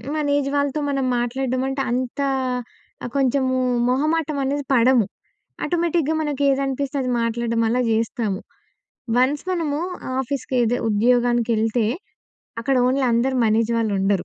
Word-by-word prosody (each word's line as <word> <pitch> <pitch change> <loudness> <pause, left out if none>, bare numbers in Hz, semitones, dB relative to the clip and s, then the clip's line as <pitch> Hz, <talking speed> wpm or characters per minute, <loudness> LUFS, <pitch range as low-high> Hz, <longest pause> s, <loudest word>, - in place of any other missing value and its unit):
మన 305 -1 -1
ఏజ్ 280 -1 -1
వాళ్ళతో 285 +1 0
మనం 275 -2 0
మాట్లాడడం 255 +1 -1
అంటే 270 0 -2
అంత 250 +2 -2 0.8
ఆహ్, 245 - -5
కొంచెము 260 -1 +1 0.3
మొహమాటమనేది 290 0 0
పడము. 240 -2 +4 0.6
ఆటోమేటిక్‌గా 335 -3 0
మనకి 290 -2 -2
ఏదనిపిస్తే 275 +1 -1
అది 255 - -2
మాట్లాడడం 230 0 -1
అలా 245 +3 +1
జేస్తాము. 220 -3 -1 0.8
వన్స్ 265 +4 +2
మనము 315 -5 -1 0.4
ఆఫీస్‌ 265 +1 -3
కేదె 245 -2 +2
ఉద్యోగానికెళ్తే 235 0 +2 0.7
అక్కడ 270 +4 0
ఓన్లీ 265 +2 +1
అందరూ 245 +3 +1
మన 215 -1 +3
ఏజ్ 230 - -3
వాళ్ళు 225 -2 0
ఉండరు. 195 0 +1
255 Hz, 125 wpm, -22 LUFS, 235-280 Hz, 0.8 s, పడము